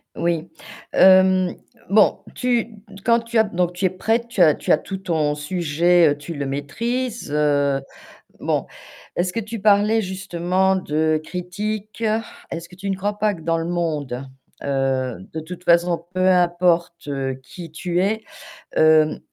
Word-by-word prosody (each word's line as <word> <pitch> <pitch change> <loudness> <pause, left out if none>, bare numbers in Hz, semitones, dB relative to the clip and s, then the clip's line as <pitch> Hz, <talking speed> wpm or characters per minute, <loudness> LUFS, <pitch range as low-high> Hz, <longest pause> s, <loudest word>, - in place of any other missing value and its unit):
Oui, 170 0 -1 0.4
hem, 185 -1 +5 0.4
bon, 210 +1 +5
tu 240 -3 -1 0.3
quand 235 0 +4
tu 230 0 -3
as 220 - +6
donc 180 -4 -1
tu 180 +2 -2
es - - +4
prête, 225 +5 0
tu 235 -5 -1
as 155 -3 +6
tu - - -2
as - - +6
tout 195 - -6
ton 160 -6 0
sujet, 170 +2 +2
heu, 145 - 0
tu 145 +3 -7
le 140 -3 -3
maîtrises, 230 - -3
heu, 145 -2 +2 0.6
bon, - - -1 0.5
est-ce 180 +1 0
que 230 - -1
tu 225 +1 -6
parlais 210 +2 +4
justement 190 -1 0
de 155 -3 0
critiques? 205 +5 -4 0.5
Est-ce 165 0 -6
que 180 - -15
tu 195 +2 -5
ne 195 - 0
crois 205 +2 -3
pas 210 0 +1
que 170 - -11
dans 165 +1 0
le 165 - -3
monde, 150 -7 -2 0.3
heu, 135 -3 -1 0.2
de 160 - -3
toute 175 +3 -9
façon 170 0 +3
peu 185 0 +2
importe 175 -3 +2 0.3
qui 165 +4 -10
tu 175 +2 -1
es, 215 +4 0 0.5
hem, 155 -1 +5
heu, - - -7
175 Hz, 160 wpm, -21 LUFS, 155-200 Hz, 0.6 s, as